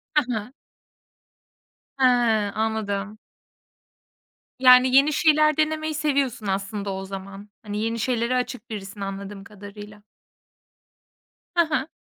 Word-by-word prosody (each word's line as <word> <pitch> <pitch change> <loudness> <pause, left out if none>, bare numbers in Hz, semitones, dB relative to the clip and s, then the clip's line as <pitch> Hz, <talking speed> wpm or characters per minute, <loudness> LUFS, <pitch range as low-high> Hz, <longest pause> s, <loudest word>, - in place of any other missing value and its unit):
Hı 300 - +5
hı. 220 +3 -5 1.5
He, 260 - +5 0.5
anladım. 215 -1 -2 1.4
Yani 255 0 +7
yeni 280 +3 +5
şeyler 305 0 +3
denemeyi 310 0 0
seviyorsun 280 -8 -1
aslında 200 +1 -3
o 190 0 -5
zaman. 195 +1 -9
Hani 210 -1 -4
yeni 230 +1 -2
şeylere 240 +1 0
açık 250 -1 -3
birisin 200 -1 -7
anladığım 195 0 -6
kadarıyla. 205 0 -12 1.5
Ha 340 -1 +4
ha. 295 -2 -1
220 Hz, 105 wpm, -24 LUFS, 200-270 Hz, 1.5 s, Yani